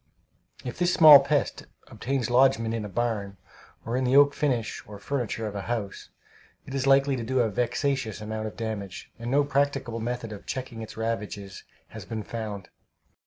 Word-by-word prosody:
If 125 - -6
this 175 0 +2
small 155 -5 +10
pest 140 +1 -1 0.2
obtains 125 -2 -3
lodgment 120 -3 +3
in 115 -2 -2
a 105 - -6
barn, 105 -3 -2 0.5
or 115 - -2
in 130 - 0
the 130 +1 +2
oak 145 0 +6
finish 125 -7 -1
or 105 -1 -9
furniture 115 0 -3
of 105 - -4
a 100 - -4
house, 110 -5 -4 0.6
it - - -9
is 135 0 -1
likely 135 0 +4
to 120 - -4
do 130 +2 +1
a 115 -3 +1
vexatious 125 0 -1
amount 110 0 -4
of 110 - -9
damage, 105 -5 -5
and 115 +1 -5
no 140 +3 +3
practicable 140 -4 0
method 120 0 -4
of 105 - -10
checking 125 -3 -5
its 110 - -9
ravages 105 -3 -4 0.2
has - - -9
been 110 -1 -5
found. 105 -4 -6
115 Hz, 180 wpm, -26 LUFS, 110-135 Hz, 0.6 s, small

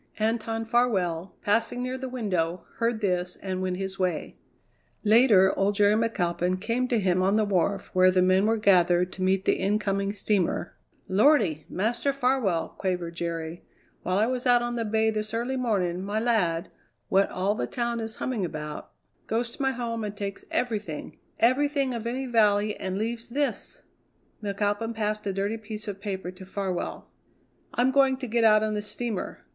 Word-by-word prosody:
Anton 225 +1 -1
Farwell, 195 -8 0
passing 230 +4 +1
near 255 +1 -3
the 260 0 -5
window, 185 -8 -2
heard 230 -1 0
this 180 -2 0
and 185 -1 -4
went 185 -1 -1
his 195 0 -5
way. 180 -4 -1 0.7
Later 215 -4 +6
old 200 +1 +1
Jerry 205 0 +4
McAlpin 185 -5 0
came 230 +5 0
to 240 -3 +1
him 185 -2 +2
on 195 +2 +3
the 215 -1 +3
wharf 195 0 0
where 185 0 +6
the 185 0 +3
men 185 +2 +4
were 225 +1 +2
gathered 180 -3 +4
to 190 - -8
meet 190 +1 +1
the - - +3
incoming 200 0 0
steamer. 200 -4 0 0.3
"Lordy! 195 - +3
Master 235 +8 0
Farwell," 250 -10 +1
quavered 180 -3 -2
Jerry; 165 0 -4 0.4
"while 185 +1 0
I 210 - +4
was 250 +1 -2
out 245 -1 +5
on 240 0 -2
the 230 -1 -1
bay 220 +1 +2
this 215 +1 -3
early 240 +3 -1
morning, 190 -8 0
my 205 +2 -1
lad, 190 -8 +1 0.4
what 195 +1 +3
all 190 +3 0
the 120 - -3
town 235 - -2
is 225 0 -4
humming 245 -6 -2
about, 150 -3 -5 0.4
goes 235 +2 -1
to - - -9
my 270 - +2
home 235 -3 -3
and 205 -1 -5
takes 200 -1 -5
everything 210 -10 -3 0.2
everything 275 +2 +2
of 230 -1 -4
any 260 +3 -2
vally 210 -3 +3
and 190 0 -3
leaves 230 +2 -3
this 280 +3 -2 0.3
" - - -32
McAlpin 205 +3 -1
passed 210 -1 -2
a - - +1
dirty 200 +3 -1
piece 215 0 -6
of 200 -1 -5
paper 190 -3 -4
to 185 +1 -12
Farwell. 190 -1 -4 0.7
"I'm 250 +2 +3
going 270 -1 +4
to 260 - -5
get 235 0 +1
out 215 -1 +6
on 215 0 0
the 210 - -1
steamer. 215 -1 -4
210 Hz, 180 wpm, -27 LUFS, 185-235 Hz, 0.7 s, Later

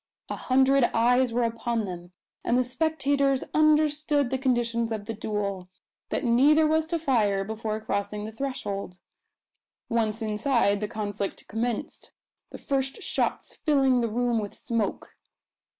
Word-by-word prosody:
A - - -2
hundred 265 0 +3
eyes 245 +2 +3
were 240 +1 +1
upon 230 -1 -1
them; 175 -2 -8 0.3
and 240 - +2
the 255 - +3
spectators 280 0 +1
understood 305 -3 +3
the 265 - 0
conditions 235 -3 0
of 215 -2 -3
the 225 - -4
duel 200 -4 -3 0.4
that - - -1
neither 280 +6 +5
was 315 +1 +2
to 335 +1 0
fire 220 -11 +1
before 220 +1 -3
crossing 210 0 -3
the 220 - -6
threshold. 205 -7 -4 0.9
Once 225 -1 0
inside, 215 -1 +1
the 210 - -1
conflict 205 -2 -4
commenced, 230 +1 -4 0.4
the - - -9
first 270 -1 -2
shots - - -1
filling 270 -5 +2
the 230 - 0
room 240 +1 0
with 205 -2 -5
smoke. 230 -4 -3
235 Hz, 140 wpm, -26 LUFS, 215-270 Hz, 0.9 s, neither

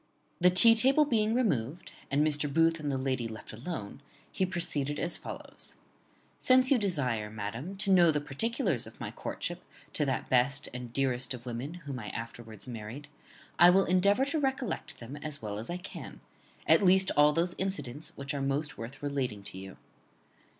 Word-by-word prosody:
_ - - -38 0.4
The 180 0 +6
tea 225 +6 +8
table 270 +7 +5
being 220 -4 +1
removed, 165 - -1 0.2
and 145 +2 +2
Mr. 150 -1 0
Booth 165 +2 +3
and 145 -2 -2
the 135 - -1
lady 130 -3 -1
left 110 0 -9
alone, 120 - -6 0.3
he 190 - 0
proceeded 150 -5 -2
as 170 - 0
follows: - - -8 0.6
"Since 255 +1 +4
you 265 - +5
desire, 130 - 0
madam, 115 - -5
to 195 0 0
know 175 -3 +6
the 150 -2 +2
particulars 170 - -1
of 110 - -14
my - - -5
courtship - - -5 0.3
to - - +2
that 130 - -1
best 130 +3 +2
and 125 -1 -6
dearest 130 0 0
of 120 0 -12
women 125 +7 -5
whom 135 -3 -5
I 105 - -7
afterwards 115 -2 -8
married, 120 +5 -7 0.5
I 175 - +9
will 190 +2 +5
endeavour 200 +8 +3
to 305 +3 -1
recollect 265 - -2
them 120 +5 -8
as 150 0 -5
well 105 -4 -5
as 110 - -7
I 175 - -2
can, 180 +1 -9 0.5
at - - +5
least 190 0 +5
all 150 0 +6
those 170 +3 0
incidents 150 -7 -4
which 140 0 -5
are 140 - -2
most 140 +2 -1
worth 120 +6 -8
relating 130 -8 -2
to 95 - -9
you. 95 0 -10
145 Hz, 185 wpm, -30 LUFS, 125-185 Hz, 0.6 s, I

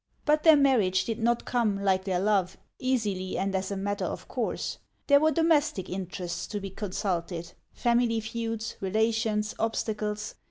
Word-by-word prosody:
But 300 0 +3
their 320 -1 +8
marriage 240 -10 +3
did 225 -1 -3
not 235 +1 +1
come, 220 -5 +1
like 190 -1 +2
their 185 -2 0
love, 195 -2 +1 0.2
easily 210 -8 -1
and 195 +1 -1
as 190 0 -1
a 200 - -3
matter 200 +1 -2
of - - -5
course. - - -3 0.3
There 285 -1 +6
were 310 +2 +4
domestic 310 - +2
interests 180 -2 -4
to 210 - -4
be 195 -1 -6
consulted, 180 -4 -3
— - - -47
family 235 -1 +2
feuds, 225 0 -4
relations, 215 +1 +1
obstacles. 215 -2 -2
210 Hz, 160 wpm, -28 LUFS, 190-235 Hz, 0.3 s, their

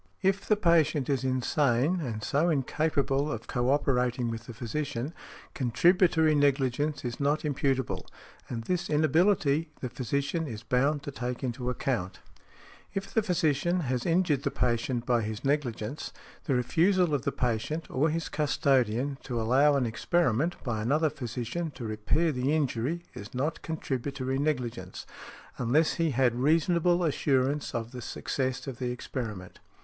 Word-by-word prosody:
If 195 +1 +1
the 215 - +4
patient 155 - +3
is 135 -2 0
insane, 130 +4 +1
and 115 -8 -4
so 155 +9 +2
incapable 145 -1 0
of 115 -1 -5
co 125 0 -1
operating 125 -4 +1
with 115 +1 -6
the 120 - -7
physician, 130 +3 -3 0.4
contributory 160 +5 +3
negligence 145 0 +1
is 120 -1 -4
not 145 +2 +1
imputable. 135 -4 -1 0.4
And 115 -2 -4
this 175 +5 -1
inability 155 +1 +3
the 125 - -4
physician 140 +6 -2
is 110 -3 -7
bound 140 +5 +1
to 145 - -5
take 125 -1 -4
into 125 0 -2
account. 120 -7 -2
|70| - - -18 0.7
If 195 0 -4
the 225 - +3
physician 175 -2 +1
has 125 -4 -1
injured 165 -5 +2
the - - 0
patient 120 0 -1
by 120 -2 +2
his 110 +3 -5
negligence, 135 -3 -2 0.3
the 135 - +1
refusal 175 +7 +2
of 140 - +1
the - - -1
patient, 125 +7 -1
or 150 +5 +2
his 165 +1 -2
custodian, 135 -3 +1
to 120 -3 -2
allow 135 +6 +4
an 135 -3 +2
experiment, 155 +5 +1
by 115 -5 -2
another 150 +7 +2
physician, 125 +4 -4
to 120 - -6
repair 110 +10 +1
the 135 +3 0
injury 145 +3 -1
is 105 +4 -9
not 150 +5 -1
contributory 135 -3 -3
negligence, 125 -6 -2 0.5
unless 140 +7 +3
he 165 - +3
had 130 -3 +2
reasonable 165 +6 +2
assurance 140 -2 +1
of 115 0 -3
the 125 -1 -7
success 130 +2 -3
of 130 -4 -6
the 125 - -1
experiment. 110 -6 -6
135 Hz, 150 wpm, -29 LUFS, 125-155 Hz, 0.7 s, the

